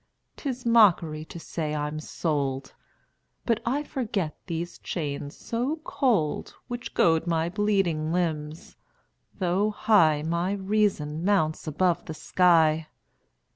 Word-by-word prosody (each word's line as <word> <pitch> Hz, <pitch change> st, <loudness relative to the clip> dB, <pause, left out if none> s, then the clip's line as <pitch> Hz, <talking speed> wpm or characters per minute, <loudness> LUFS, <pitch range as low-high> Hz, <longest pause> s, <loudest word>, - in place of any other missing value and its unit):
'Tis 255 Hz, -4 st, -5 dB
mockery 180 Hz, -9 st, +4 dB
to 170 Hz, -, -9 dB
say 155 Hz, -2 st, -3 dB
I'm 150 Hz, +1 st, -3 dB
sold! 140 Hz, -4 st, -2 dB, 0.7 s
But 230 Hz, -2 st, +2 dB
I 280 Hz, +5 st, +1 dB
forget 210 Hz, -, -3 dB
these 170 Hz, 0 st, -4 dB
chains 145 Hz, -3 st, -4 dB
so 245 Hz, +6 st, -2 dB
cold, 215 Hz, -, 0 dB
Which 245 Hz, 0 st, -6 dB
goad 165 Hz, 0 st, +3 dB
my 165 Hz, 0 st, +1 dB
bleeding 190 Hz, -6 st, 0 dB
limbs; 160 Hz, -3 st, -3 dB, 0.6 s
though 190 Hz, +2 st, +1 dB
high 170 Hz, -8 st, +3 dB
My 170 Hz, +4 st, 0 dB
reason 190 Hz, -6 st, 0 dB
mounts 165 Hz, -6 st, +1 dB
above 175 Hz, +3 st, +1 dB
the 160 Hz, -, -6 dB
sky. 160 Hz, -3 st, +3 dB
170 Hz, 115 wpm, -26 LUFS, 155-205 Hz, 0.7 s, mockery